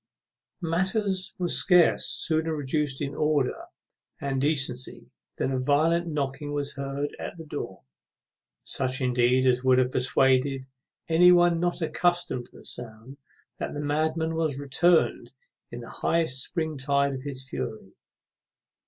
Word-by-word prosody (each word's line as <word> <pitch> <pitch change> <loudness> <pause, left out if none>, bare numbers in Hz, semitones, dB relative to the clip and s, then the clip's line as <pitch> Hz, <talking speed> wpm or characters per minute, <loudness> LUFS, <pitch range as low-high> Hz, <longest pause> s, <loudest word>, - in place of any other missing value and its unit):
_ - - -2
Matters 190 +3 0
were 180 -2 -1
scarce 180 0 +4
sooner 160 0 +1
reduced 145 -1 -1
into 140 0 -5
order 150 -4 0 0.5
and 135 -1 -2
decency 140 -4 +2 0.2
than 135 - -2
a 130 - -1
violent 160 +6 +1
knocking 145 -1 -3
was 145 -1 -3
heard 140 +1 -4
at - - -7
the 165 - -9
door, 145 - -7 0.8
such 130 +1 0
indeed 125 0 +2
as 125 0 +2
would 130 -1 +4
have 130 0 +2
persuaded 130 +1 +1 0.4
any 175 +2 +6
one 175 -1 +4
not 175 0 -1
accustomed 175 -6 0
to - - -18
the - - -14
sound 120 +3 -4 0.4
that - - -4
the - - -4
madman 155 +2 -1
was 160 -4 -1
returned 160 +5 +1 0.4
in - - -8
the - - -10
highest 160 -6 +1
spring 160 -4 -3
tide 140 +1 +1
of 130 - -6
his 135 -1 -4
fury. 110 -6 -6
145 Hz, 145 wpm, -26 LUFS, 130-165 Hz, 0.8 s, any